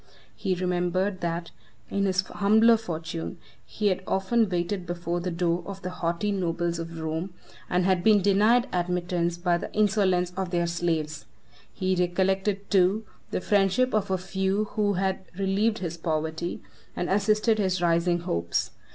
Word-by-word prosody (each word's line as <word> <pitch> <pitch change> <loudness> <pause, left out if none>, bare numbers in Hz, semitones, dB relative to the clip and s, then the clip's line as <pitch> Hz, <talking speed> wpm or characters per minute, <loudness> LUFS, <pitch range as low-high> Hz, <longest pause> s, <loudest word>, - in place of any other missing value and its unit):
He 190 -3 -1
remembered, 180 +2 0
that, 170 0 -3 0.4
in 200 0 +1
his 190 -1 +2
humbler 220 +4 +4
fortune, 165 -3 -5 0.3
he 210 -2 -1
had 185 0 -1
often 210 +3 +2
waited 175 +1 -2
before 175 0 -2
the 180 +1 -3
door 170 0 0
of 195 -1 -7
the 180 - -3
haughty 180 +3 -1
nobles 175 -3 -1
of 165 0 -6
Rome, 160 +3 -3 0.3
and 180 0 +2
had 185 -2 +2
been 215 -2 +6
denied 215 +6 +4
admittance 175 -1 0
by 175 0 +1
the - - -6
insolence 190 -4 +2
of 190 -1 -2
their 175 -1 +1
slaves. 165 -3 -2 0.4
He 185 -1 -1
recollected 190 +3 0
too 195 +3 +3 0.2
the - - -2
friendship 205 +6 +2
of 215 -3 +1
a 190 - +1
few 190 +2 -1
who 205 -1 +1
had 190 0 0 0.2
relieved 200 +3 +1
his 170 -4 -4
poverty, 160 +1 -3 0.3
and 175 - -2
assisted 215 +3 +2
his 185 -2 +1
rising 175 0 +2
hopes. 85 - -1
185 Hz, 155 wpm, -26 LUFS, 175-200 Hz, 0.4 s, been